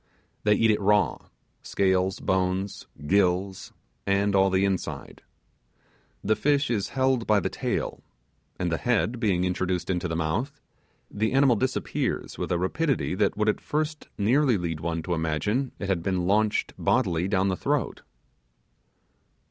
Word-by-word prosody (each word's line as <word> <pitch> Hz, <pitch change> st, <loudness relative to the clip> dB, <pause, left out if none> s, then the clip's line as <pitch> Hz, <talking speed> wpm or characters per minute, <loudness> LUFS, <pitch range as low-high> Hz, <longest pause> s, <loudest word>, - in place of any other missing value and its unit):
They 105 Hz, 0 st, +5 dB
eat 115 Hz, +1 st, +3 dB
it 105 Hz, -, 0 dB
raw; 100 Hz, -3 st, +2 dB, 0.3 s
scales, 95 Hz, -1 st, +1 dB
bones, 95 Hz, +1 st, -1 dB, 0.2 s
gills, 95 Hz, +1 st, +1 dB, 0.4 s
and 100 Hz, +1 st, +2 dB
all 95 Hz, 0 st, +4 dB
the 95 Hz, +1 st, +2 dB
inside. 95 Hz, -2 st, -4 dB, 1.0 s
The 110 Hz, +2 st, +2 dB
fish 145 Hz, 0 st, +1 dB
is 105 Hz, -4 st, -1 dB
held 130 Hz, -3 st, +2 dB
by 105 Hz, -1 st, +4 dB
the -, -, -2 dB
tail, -, -, -3 dB, 0.6 s
and 90 Hz, -2 st, -1 dB
the 80 Hz, -, -1 dB
head 120 Hz, 0 st, 0 dB
being 95 Hz, -6 st, +1 dB
introduced 90 Hz, 0 st, -1 dB
into 90 Hz, -1 st, -1 dB
the 80 Hz, -, -3 dB
mouth, 110 Hz, -, -2 dB, 0.5 s
the 110 Hz, +3 st, -1 dB
animal 135 Hz, -2 st, +5 dB
disappears 130 Hz, +4 st, -2 dB
with -, -, -3 dB
a 90 Hz, -, +2 dB
rapidity 135 Hz, -, 0 dB
that 100 Hz, +1 st, 0 dB
would 105 Hz, 0 st, +1 dB
at 105 Hz, -, +1 dB
first 155 Hz, 0 st, -3 dB
nearly 125 Hz, +3 st, +3 dB
lead 85 Hz, -3 st, -3 dB
one 80 Hz, 0 st, -3 dB
to 90 Hz, -, -2 dB
imagine 85 Hz, -, -1 dB
it 100 Hz, -, -5 dB
had 95 Hz, -3 st, 0 dB
been 90 Hz, 0 st, -1 dB
launched 105 Hz, +3 st, +1 dB
bodily 85 Hz, 0 st, +1 dB
down 95 Hz, 0 st, +1 dB
the 95 Hz, -, 0 dB
throat. -, -, -1 dB
100 Hz, 150 wpm, -26 LUFS, 90-110 Hz, 1.0 s, They